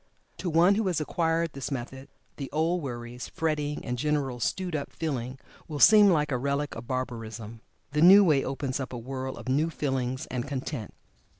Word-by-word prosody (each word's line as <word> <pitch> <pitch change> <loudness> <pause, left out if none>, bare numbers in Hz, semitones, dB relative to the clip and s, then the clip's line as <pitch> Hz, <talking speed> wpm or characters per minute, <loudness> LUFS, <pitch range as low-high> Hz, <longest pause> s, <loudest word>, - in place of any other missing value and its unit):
To 180 - -2
one 170 +4 +5
who 210 0 0
has 175 -4 +1
acquired 165 +1 0
this 135 0 -5
method, 130 0 -6 0.3
the 135 -2 -5
old 165 +3 +1
worries, 120 -2 -6
frettings, 150 -2 -2
and 125 0 -3
general 140 -3 -1
"stewed 180 - -2
up" 140 - -4
feeling, 130 -5 -3 0.3
will 150 - -5
seem 210 +6 +8
like 150 -4 +2
a 125 - 0
relic 140 +2 -1
of 115 +1 -8
barbarism. 115 -3 -5 0.3
The 150 +1 0
new 195 +4 +9
way 150 -7 +3
opens 135 0 -3
up 130 -1 -5
a - - -4
world 130 +2 -5
of - - -10
new 145 +5 +2
feelings 130 -4 -2
and 125 +1 -3
content. 130 -4 -5
140 Hz, 185 wpm, -28 LUFS, 130-160 Hz, 0.3 s, new